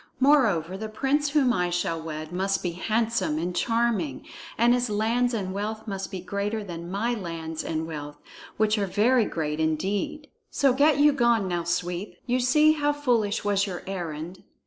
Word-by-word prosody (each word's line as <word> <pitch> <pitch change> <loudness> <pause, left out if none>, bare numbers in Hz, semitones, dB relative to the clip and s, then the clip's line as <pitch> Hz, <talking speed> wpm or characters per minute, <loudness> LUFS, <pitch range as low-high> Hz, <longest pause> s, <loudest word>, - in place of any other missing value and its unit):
Moreover, 220 - +3
the 220 0 -5
prince 275 +6 0
whom 280 -4 +3
I 180 -4 0
shall 170 -2 -1
wed 155 0 -6
must 195 +2 0
be 175 - -1
handsome 220 -1 0
and 175 +2 -2
charming, 225 - 0 0.3
and 235 +1 +5
his 245 -1 0
lands 230 +4 +1
and 195 -5 -3
wealth 215 +3 -4
must 195 -2 -4
be 190 - -5
greater 200 +4 -3
than 170 -3 -7
my 215 +6 -1
lands 165 -6 -5
and 160 0 -2
wealth, 150 -2 -7 0.4
which 215 0 +2
are 200 - 0
very 225 +5 +3
great 150 -1 -3
indeed. 200 - -1 0.2
So 275 -3 +3
get 285 +2 +4
you 295 +1 +6
gone, 235 -6 +2
now, 175 -2 -2
Sweep. 175 +2 -2
You 250 0 +1
see 300 +5 +5
how 295 -1 +1
foolish 240 -8 0
was 200 0 +2
your 180 -3 -6
errand." 175 -2 -5
205 Hz, 175 wpm, -26 LUFS, 175-240 Hz, 0.4 s, you